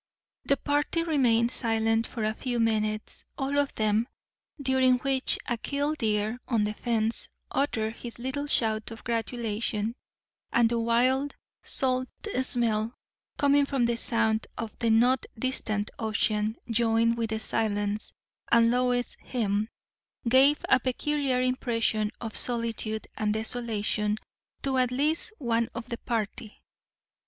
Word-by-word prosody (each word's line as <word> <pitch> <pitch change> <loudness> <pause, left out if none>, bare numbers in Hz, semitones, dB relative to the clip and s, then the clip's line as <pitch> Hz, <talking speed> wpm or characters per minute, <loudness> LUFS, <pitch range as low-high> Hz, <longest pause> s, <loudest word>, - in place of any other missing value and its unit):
The 280 - +3
party 295 +3 0
remained 245 -7 +3
silent 225 -1 +1
for 230 - -4
a 215 0 +1
few 245 +1 -2
minutes, 215 -1 0
all 280 0 0
of 285 -1 +1
them; 215 +2 +2 0.5
during 260 -2 +3
which 265 +1 +1
a 240 - -1
killdeer 240 -6 0
on 230 -4 +2
the 210 0 -1
fence 225 0 -1 0.2
uttered 225 -5 0
his 235 -1 -7
little 265 +4 -3
shout 220 -5 +1
of 225 -1 -10
gratulation; 225 -2 -1 0.6
and 235 -1 +4
the 235 - +1
wild, 255 +5 +2 0.3
salt 255 -1 0 0.3
smell 230 -3 +1 0.4
coming 285 0 +4
from 270 -4 +1
the 235 0 +1
Sound 225 -1 0
and 225 -2 -4
the 235 -1 +2
not 240 +3 +4
distant 220 -4 0
ocean, 215 0 0
joined 230 0 +2
with 230 -1 -2
the 220 0 -2
silence 205 -1 -1 0.4
and 230 0 +6
Lois's 245 0 +1
hymn, 215 -3 -1 0.6
gave 270 +4 +5
a - - +5
peculiar 265 +1 0
impression 230 -4 +1
of 225 -2 -5
solitude 230 -2 -1
and 210 -1 0
desolation 220 -2 -1 0.5
to 265 -1 +1
at 250 -1 +3
least 295 - 0
one 235 -3 0
of 230 +1 -6
the 235 - -4
party. 220 -2 -4
235 Hz, 130 wpm, -28 LUFS, 220-255 Hz, 0.6 s, and